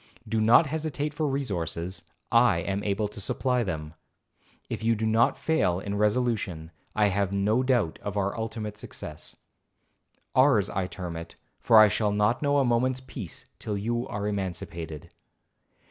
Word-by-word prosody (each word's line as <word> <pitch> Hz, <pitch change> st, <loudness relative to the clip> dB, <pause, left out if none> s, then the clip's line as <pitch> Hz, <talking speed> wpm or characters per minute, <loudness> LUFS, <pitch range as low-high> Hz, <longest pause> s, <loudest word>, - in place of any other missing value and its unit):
Do 110 Hz, 0 st, 0 dB
not 115 Hz, +8 st, +6 dB
hesitate 150 Hz, 0 st, -3 dB
for 155 Hz, 0 st, -1 dB
resources, 95 Hz, -, -2 dB, 0.3 s
I 115 Hz, -6 st, +5 dB
am 100 Hz, +3 st, -2 dB
able 105 Hz, +1 st, 0 dB
to 105 Hz, 0 st, -9 dB
supply 125 Hz, +5 st, 0 dB
them. 80 Hz, -7 st, -4 dB, 0.7 s
If -, -, -5 dB
you 115 Hz, 0 st, +3 dB
do 110 Hz, +1 st, -2 dB
not 110 Hz, +2 st, +3 dB
fail 125 Hz, -, +1 dB
in 100 Hz, +1 st, -4 dB
resolution, 105 Hz, -6 st, 0 dB, 0.2 s
I 105 Hz, -1 st, +4 dB
have 100 Hz, 0 st, 0 dB
no 105 Hz, +5 st, +2 dB
doubt 120 Hz, -10 st, +1 dB
of 105 Hz, 0 st, -4 dB
our 100 Hz, 0 st, 0 dB
ultimate 110 Hz, -2 st, -4 dB
success.—Ours 110 Hz, -, -3 dB
I 95 Hz, -1 st, -1 dB
term 90 Hz, -3 st, -6 dB
it, 85 Hz, 0 st, -8 dB, 0.2 s
for 110 Hz, -, +5 dB
I 110 Hz, 0 st, +9 dB
shall 105 Hz, 0 st, +1 dB
not 105 Hz, +4 st, +1 dB
know 145 Hz, -1 st, +2 dB
a 140 Hz, -, +3 dB
moment's 125 Hz, +2 st, +1 dB
peace 130 Hz, 0 st, -8 dB
till 105 Hz, -3 st, -3 dB
you 120 Hz, +4 st, -2 dB
are 100 Hz, 0 st, -3 dB
emancipated. 85 Hz, -6 st, -4 dB
105 Hz, 155 wpm, -27 LUFS, 95-125 Hz, 0.7 s, I